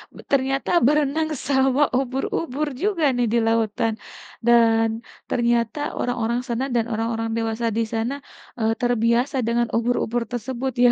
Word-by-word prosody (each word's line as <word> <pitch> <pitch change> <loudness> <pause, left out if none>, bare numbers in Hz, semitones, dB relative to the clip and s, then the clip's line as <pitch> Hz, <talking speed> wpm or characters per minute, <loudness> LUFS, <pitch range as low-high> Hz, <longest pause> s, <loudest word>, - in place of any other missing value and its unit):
b - - -13
ternyata 270 0 +1 0.2
berenang 300 +2 +2 0.2
sama 265 0 +2 0.2
ubur-ubur 270 +3 -2 0.2
juga 390 -6 0
nih 245 - +1
di - - +4
lautan. 225 0 +1 0.5
Dan 225 -1 +5 0.4
ternyata 235 +2 +1 0.2
orang-orang 240 -1 -1
sana 240 +1 -1
dan 230 -1 +2
orang-orang 225 +1 -2
dewasa 225 +1 -2
di - - +2
sana, 225 +4 -1 0.5
eee, 220 0 +2
terbiasa 245 +3 +1
dengan 235 0 +1
ubur-ubur 235 0 0
tersebut 260 +2 -3
ya. 240 - +7
240 Hz, 130 wpm, -23 LUFS, 230-265 Hz, 0.5 s, ya